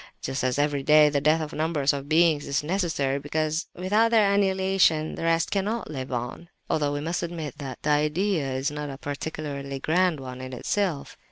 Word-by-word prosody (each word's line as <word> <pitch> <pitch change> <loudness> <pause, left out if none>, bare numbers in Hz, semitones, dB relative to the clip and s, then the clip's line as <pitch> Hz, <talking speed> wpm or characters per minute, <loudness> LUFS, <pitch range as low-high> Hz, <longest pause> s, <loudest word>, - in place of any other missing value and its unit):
Just 135 0 -3
as 130 +1 0
every 145 -1 +1
day 150 +2 +6
the 145 -1 0
death 155 +2 +3
of 155 -1 -5
numbers 155 -3 +1
of 140 0 -5
beings 160 -2 +3
is 140 +1 0
necessary 155 -6 0
because 155 +3 -2
without 210 +6 +2
their 215 -3 +4
annihilation 190 -5 +2
the - - -7
rest 165 0 +1
cannot 205 -1 -1
live 130 -3 -5
on—(although 145 +4 -3
we 145 - -2
must 165 +3 -2
admit 160 -4 -5
that 135 -3 -7
the 150 - +1
idea 150 +1 +1
is 130 +2 -1
not 150 0 -5
a 135 - -7
particularly 145 -1 -5
grand 175 +1 +1
one 130 -1 -7
in 130 0 -7
itself!) 170 +3 -2
150 Hz, 185 wpm, -26 LUFS, 140-170 Hz, -, day